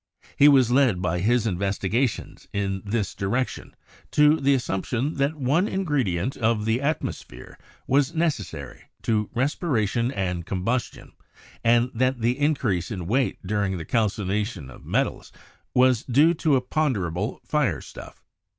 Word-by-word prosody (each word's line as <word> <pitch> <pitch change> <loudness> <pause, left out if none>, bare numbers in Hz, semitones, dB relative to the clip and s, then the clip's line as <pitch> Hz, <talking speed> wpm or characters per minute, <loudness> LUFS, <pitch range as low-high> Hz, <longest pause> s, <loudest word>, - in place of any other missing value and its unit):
He 145 - +6
was 130 -4 +5
led 125 -7 +3
by 90 -1 -1
his 115 +5 +2
investigations 100 +5 -1
in 95 -1 -2
this 105 -1 -2
direction 120 +7 -3 0.3
to 150 +1 +4
the 140 0 +3
assumption 120 +4 -2
that 140 +3 +1
one 150 +7 +1
ingredient 135 - -1
of 110 -2 +1
the 115 +3 +1
atmosphere 150 +2 -4 0.3
was 140 +4 +1
necessary 95 - -3 0.2
to 105 -2 0
respiration 120 - 0
and 90 -7 -2
combustion, 100 +8 -3 0.5
and 120 +2 +3
that 130 +2 0
the 120 +4 0
increase 120 - 0
in 90 -5 -5
weight 125 +2 -1
during 100 -1 -1
the 80 - -6
calcination 105 - -1
of - - -14
metals - - -2 0.4
was 125 -2 +4
due 145 +7 +4
to 155 -3 +1
a 130 - +2
ponderable 110 - -1
firestufT. 150 -3 -2
120 Hz, 130 wpm, -24 LUFS, 100-135 Hz, 0.5 s, He